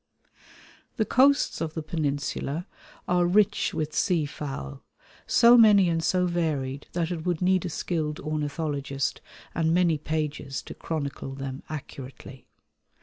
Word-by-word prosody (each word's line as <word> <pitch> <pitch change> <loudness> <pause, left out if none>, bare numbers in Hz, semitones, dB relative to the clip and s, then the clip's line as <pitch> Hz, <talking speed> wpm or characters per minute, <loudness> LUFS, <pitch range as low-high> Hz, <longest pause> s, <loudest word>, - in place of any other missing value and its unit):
The 220 - +2
coasts 280 +5 +3
of 160 -1 -3
the 160 - -3
Peninsula 150 +1 -2 0.4
are 180 -1 +3
rich 200 +3 +3
with 155 -1 -3
seafowl, 145 - -2 0.5
so 235 +1 +7
many 205 -5 +7
and 165 -1 0
so 180 +2 +2
varied 150 -6 -2
that 170 0 -1
it 165 -3 -4
would 175 -2 -1
need 185 0 +2
a - - -2
skilled 155 -1 -2
ornithologist 150 -3 -2 0.3
and 165 0 +1
many 170 -4 +3
pages 150 -3 -3
to - - -8
chronicle 140 -4 -4
them 135 0 -6
accurately. 130 -3 -9
155 Hz, 130 wpm, -26 LUFS, 140-175 Hz, 0.5 s, so